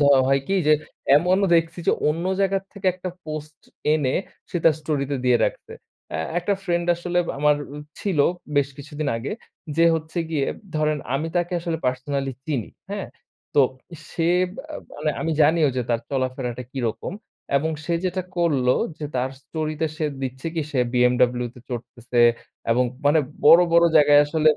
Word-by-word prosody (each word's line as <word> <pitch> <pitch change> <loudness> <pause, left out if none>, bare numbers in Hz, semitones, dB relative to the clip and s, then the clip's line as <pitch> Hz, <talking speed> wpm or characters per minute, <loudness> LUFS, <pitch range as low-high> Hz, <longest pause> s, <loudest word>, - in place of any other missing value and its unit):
ধ - - +4 0.2
হয় 135 +1 +3
কি? 195 - +1
যে 155 - +6 0.4
এমনও 185 +5 +3
দেখছি 165 +1 0
যে - - +5 0.2
অন্য 165 +3 -1 0.2
জায়গা 195 0 +2
থেকে 200 -2 -6
একটা 185 0 -5 0.2
পোস্ট 155 0 -6 0.4
এনে 140 -4 +1 0.4
সে - - -2
তার 165 - +6
স্টোরিতে 145 -2 -1
দিয়ে 125 -1 +5
রাখছে। - - -4 0.4
এ - - -3 0.2
একটা 190 +4 0
ফ্রেন্ড 175 -2 0
আসলে 175 0 -1 0.2
আমার 150 0 +4
আ 145 - -10 0.2
ছিল 190 -7 -1 0.4
বেশ 140 -1 +3
কিছুদিন 150 +1 -4
আগে। 115 +4 -4 0.4
যে 165 - +5
হচ্ছে 160 +2 -4
গিয়ে 150 -4 +1 0.3
ধরেন 155 0 +1 0.2
আমি 150 +4 0
তাকে 175 +1 0
আসলে 165 -2 -2
পার্সোনালি 135 +2 -1 0.2
চিনি। 140 -8 -2 0.2
হ্যাঁ? 200 -1 -4 0.5
তো 145 - +6 0.5
সে 165 - -1 0.3
বা 270 - -7 0.3
মানে 150 +1 0
আমি 165 - 0
জানিও 155 0 +4
যে 125 - +1
তার 115 -1 +1
চলাফেরাটা 130 -2 -2
কিরকম 125 +4 -3 0.4
এবং 160 +3 +1
সে 170 - 0
যেটা 185 0 -1
করলো 140 -8 +3 0.3
যে 155 - -5
তার 130 +1 0
স্টোরিতে 155 +2 -2
সে 155 - 0 0.2
দিচ্ছে 130 +2 -4
কি 165 - 0
সে 135 - 0 0.2
বিএমডব্লিউতে 125 0 +2
চড়তেছে 120 0 -5 0.5
এবং 125 +2 +4 0.2
মানে 150 +2 +5 0.3
বড়, 165 +3 +9
বড় 170 0 +6
জায়গায় 145 -1 +7
আসলে 155 +1 +3
হ - - 0
150 Hz, 165 wpm, -23 LUFS, 130-165 Hz, 0.5 s, বড়